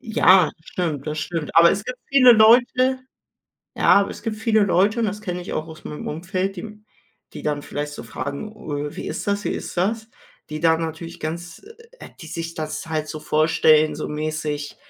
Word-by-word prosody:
Ja, 190 - +4
stimmt, 160 -4 -4
das 150 0 -3
stimmt. 165 -4 -4
Aber 170 0 +8
es 200 +1 -2
gibt 255 +1 -6
viele 255 -3 +7
Leute 245 +4 +4 0.8
ja, - - +1
aber 200 - -1
es - - -9
gibt 220 -1 -3
viele 220 -1 +2
Leute 200 +5 +2
und 230 - +1
das 205 0 -4
kenne 180 -4 -4
ich - - -7
auch 155 - -3
aus 160 -1 -12
meinem 150 - -7
Umfeld, 185 +4 -3
die 175 - -5
m 210 -1 -11 0.5
die - - -8
dann 150 -1 -1
vielleicht 145 0 -5
so - - -8
fragen: 140 - -5
„Äh, 150 -8 -5
wie - - -6
ist - - -5
das? 200 0 -1
Wie - - -1
ist - - -5
das?“ 220 +5 -1 0.4
Die 155 0 -5
da 165 -1 +3
natürlich 165 +1 -6
ganz 165 +2 -6 0.4
äh, - - -10
die 160 - -9
sich 165 +1 -5
das 155 0 -5
halt 155 -1 -2
so 155 - -6
vorstellen, 155 0 +3
so 155 - -4
mäßig 150 -1 -4
170 Hz, 200 wpm, -22 LUFS, 155-210 Hz, 0.8 s, Aber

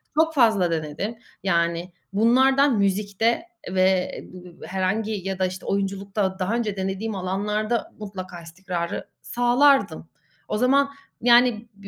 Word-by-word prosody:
çok 320 +1 +3
fazla 220 - +3
denedim. 160 +8 -3 0.3
Yani 170 -1 0 0.2
bunlardan 260 +4 +4
müzikte 205 - +1 0.3
ve 185 0 +1 0.4
e - - -8
b 180 -2 -13
b - - -8
herhangi 190 +4 -1 0.2
ya 190 -1 -3
da, 185 - +2
işte, 185 +1 -5
oyunculukta 195 0 -2
daha 195 +5 0
önce 220 -4 -1
denediğim 195 +3 -3
alanlarda 210 +5 -2
mutlaka 185 -4 -7
istikrarı 170 +1 -5
sağlardım. 245 - +2 0.4
O - - -1
zaman 275 +4 +3 0.3
yani 240 -1 +4
b 200 0 -13
200 Hz, 130 wpm, -24 LUFS, 185-235 Hz, 0.4 s, bunlardan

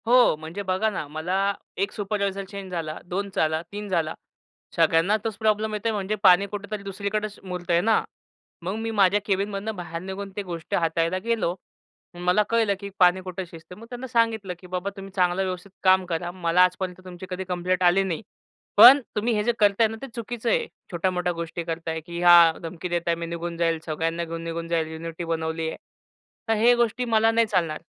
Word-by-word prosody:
हो. 245 -6 +6
म्हणजे 160 +5 -6
बघा 190 +3 +1
ना. 185 -8 -4
मला 180 +7 -1 0.2
1 200 +2 0
सुपरवायझर 200 -1 -2
चेंज 195 -2 -8
झाला, 160 -3 -4
2 195 +3 -3
झाला, 155 0 +1
3 205 +1 -6
झाला. 165 -4 0 0.6
सगळ्यांना 165 +5 +3
तोच 225 -2 -2
प्रॉब्लेम 215 0 +1
येतोय 215 +2 -1
म्हणजे 205 0 -2
पाणी 185 0 +7
कुठे 205 0 -6
तरी 210 -2 -4
दुसरीकडेच 200 +2 -3
मुरतंय 175 -2 0
ना. 220 +2 +3 0.6
मग 185 +4 -2
मी 225 +1 -3
माझ्या 200 -1 +4
केबिनमधनं 200 +2 -1
बाहेर 170 -2 -6
निघून 190 +2 -6
ते 205 - -3
गोष्टी 170 -4 -4
हाताळायला 165 +1 +1
गेलो. 225 -7 0 0.6
मला 180 +4 +2
कळलं 225 -3 +2
की 200 0 -6
पाणी 180 0 +5
कुठं 185 0 -5
शिजतय. 165 +2 -12
मग 225 - -12
त्यांना 250 +1 -6
सांगितलं, 225 -5 +1
"की 180 - -13
बाबा 180 +2 -3
तुम्ही 195 0 -8
चांगलं 180 0 +2
व्यवस्थित 185 +1 -5
काम 185 0 +5
करा. 175 0 -3
मला 175 -1 +2
आजपर्यंत 180 0 -1
तुमची 180 0 -9
कधी 185 0 -4
कंप्लेंट 180 +1 0
आली 180 +2 +5
नाही. 185 -2 -3 0.6
पण 275 +3 +10
तुम्ही 225 +3 +1
हे 210 -1 +1
जे 240 - +2
करताय 210 +2 +4
ना, 225 +1 -7
ते 270 - -6
चुकीचं 235 0 -3
आहे. 480 -2 +1 0.2
छोट्या-मोठ्या 180 0 0
गोष्टी 170 0 -5
करताय, 165 -1 -3
की 170 +2 -8
ह्या 175 -1 +8
धमकी 170 +2 -5
देत 175 0 0
आहे 170 - +3
मी 170 0 -5
निघून 170 0 -5
जाईल, 165 -1 +1
सगळ्यांना 165 +2 -2
घेऊन 165 0 -6
निघून 165 0 -4
जाईल. 165 -1 0
युनिटी 165 +1 -6
बनवली 160 0 -2
आहे. - - -7 0.7
तर - - +4
हे 240 +1 +7
गोष्टी 240 +1 0
मला 225 -1 +3
नाही 230 0 +3
चालणार." 170 -7 0
185 Hz, 195 wpm, -25 LUFS, 170-210 Hz, 0.7 s, पण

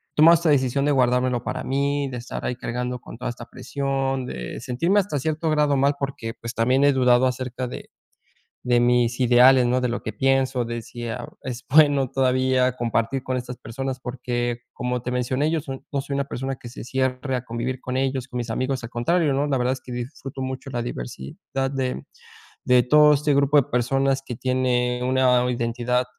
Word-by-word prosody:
Tomar 165 +3 +7
esta 165 -1 +1
decisión 140 0 +2
de 145 - +2
guardármelo 125 -2 +2
para - - -4
mí, 140 +1 0
de 125 -2 -5
estar 120 - -6
ahí 125 - -1
cargando 125 0 -4
con 115 - -11
toda 125 -1 -3
esta 120 0 -9
presión, 135 -2 -2
de - - -6
sentirme 170 +11 +1
hasta 180 -7 -1
cierto 155 +3 -1
grado 150 -2 +2
mal, 140 +1 +2
porque, 130 -5 -4
pues, 115 +1 -6
también 130 +4 +2
he 145 -1 +5
dudado 125 -1 +4
acerca 125 0 -2
de - - -8 0.7
de 120 -1 +3
mis 120 0 +2
ideales, 125 +1 +6
¿no? 125 +1 +2
De 125 - 0
lo 120 - -3
que - - -4
pienso, 135 -1 +1
de 120 0 -4
si 120 0 -8
ah, 120 +1 -5
es 125 -2 -6
bueno 145 -4 +5
todavía 130 -1 +2
compartir 120 +2 -1
con 130 0 -2
estas 125 0 -5
personas. 130 +3 -5
Porque, 120 -1 -3
como 125 0 -3
te 125 - -3
mencioné, 130 +4 0
yo 165 - +1
soy 135 -2 -7
no 140 - 0
soy 140 +1 -5
una 140 0 0
persona 135 0 -4
que 120 - -10
se 120 - -9
cierre 130 +1 -1
a 125 - -5
convivir 125 +2 -4
con 130 0 -4
ellos, 130 -1 -1
con 125 - -5
mis 120 -1 -4
amigos, 130 +2 -1
al 115 - -7
contrario, 145 +5 +1
¿no? 140 +2 +1
La 135 -2 +1
verdad 125 +1 +1
es 130 - -4
que 125 - -10
disfruto 130 +2 -6
mucho 130 +1 -5
la 120 -2 -2
diversidad 120 - -5
de, 130 -1 -1
mm, - - -8 0.6
de 125 -1 +5
todo 150 +3 +6
este 145 0 +1
grupo 140 +1 +3
de 135 - +2
personas 135 +2 +1
que 120 - -4
tiene 125 -1 0
una 125 -1 +3
identidad 120 +1 0
130 Hz, 205 wpm, -23 LUFS, 125-135 Hz, 0.7 s, Tomar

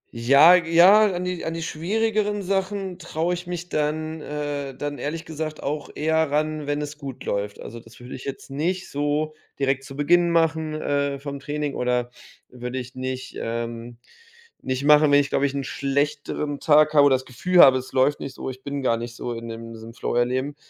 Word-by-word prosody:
Ja, 140 +8 +7
ja, 180 +5 +6
an 180 0 -3
die 180 -1 -3
an 165 - -3
die 165 - -4
schwierigeren 210 +5 -1
Sachen 190 -1 -2
traue 170 0 -2
ich 175 0 -6
mich 175 0 -5
dann, 155 +1 -2
äh 145 -2 -4
dann 145 0 -4
ehrlich 160 +3 -4
gesagt 155 -1 -5
auch 150 +1 -3
eher 160 0 +1
ran, 150 0 -1
wenn 145 0 -1
es 150 +1 -8
gut 135 -3 -8
läuft. 100 0 -3
Also, 115 +2 -8
das 115 0 -17
würde 125 +1 -10
ich 130 - -8
jetzt 135 0 -7
nicht 180 +7 -2
so 145 +2 -1 0.3
direkt 135 -1 0
zu 135 0 -10
Beginn 175 +4 +3
machen, 160 -2 +1
äh, 140 -1 -1
vom 140 0 -6
Training 145 0 -3
oder 125 -1 -1 0.4
würde 125 +1 -6
ich 125 0 -6
nicht, 130 0 -5
ähm 115 +1 -5 0.6
nicht 130 +1 -3
machen, 150 0 +6
wenn 145 - +7
ich, 140 0 0
glaube 140 - +2
ich, 140 - -6
'n 140 - -2
schlechteren 145 +1 -2
Tag 155 0 +4
habe 145 -2 +6
oder 135 - +4
das 130 0 -4
Gefühl 180 +9 0
habe, 130 -1 +7
es 130 - -10
läuft 130 +3 +2
nicht 135 - -7
so, - - -5
ich 130 0 -12
bin 140 -1 -4
gar 115 -3 +2
nicht 120 +1 -7
so 120 - -4
in 115 0 -7
dem 115 0 -8
diesem 115 +1 -11
Flow - - -3
halt 120 0 +2
eben, 135 +3 -2
145 Hz, 205 wpm, -24 LUFS, 130-160 Hz, 0.6 s, Ja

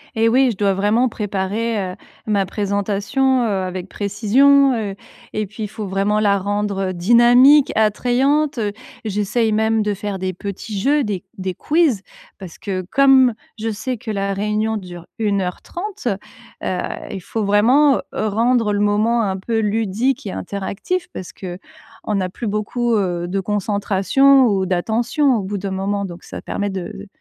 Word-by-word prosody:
Eh 225 +1 +3
oui, 260 +2 +4
je 195 - -8
dois 200 -2 +2
vraiment 215 +6 +2
préparer, 210 +2 -2
heu, - - -11 0.3
ma 200 -2 +1
présentation, 205 +7 0
heu, - - +1 0.2
avec 185 0 -5
précision, 255 +7 +3
heu 205 -3 -3 0.4
et 215 0 -1
puis, 215 +3 -8
il - - -2
faut 215 0 -6
vraiment 200 +2 +1
la 200 -1 +3
rendre 200 -1 -1
dynamique, 240 +9 +5
attrayante. 255 +6 +2 0.5
J'essaye 215 +2 0
même 220 +1 +2
de 210 -1 0
faire 200 -1 -4
des 185 0 -2
petits 200 +2 -6
jeux, 285 +5 +2
des 200 -4 -3
des 185 -1 -3
quiz, 295 - +1 0.4
parce 185 -4 -10
que 190 -2 -3
comme 265 -3 +5 0.3
je 225 +1 -2
sais 245 +4 -3
que 230 0 -9
la 200 -1 -1
réunion 210 +2 -1
dure 175 -3 -9
1 200 -3 +1
heure 180 -1 -4
30, 390 - -6 0.6
heu, - - -2 0.4
il 195 -2 -5
faut 220 +5 -3
vraiment 245 +8 +4
rendre 225 +1 +1
le 205 - 0
moment 215 +3 +2
un 190 -1 -1
peu 225 +4 -2
ludique 220 +4 0
et 195 - -3
interactif 205 - -4
parce 185 - -7
qu'on 190 +3 -8
n'a 185 -2 -1
plus 230 +4 -6
beaucoup, 225 +3 -1
heu, 175 -4 -1
de 195 +2 -1
concentration 210 +7 +3
ou 195 -3 +1
d'attention 235 - +1
au - - -1
bout 200 +1 -3
d'un 195 0 -4
moment 200 +1 -2
donc 175 -1 -9
ça - - -8
permet 205 0 -3
de 190 +1 -6
210 Hz, 165 wpm, -20 LUFS, 195-240 Hz, 0.6 s, dynamique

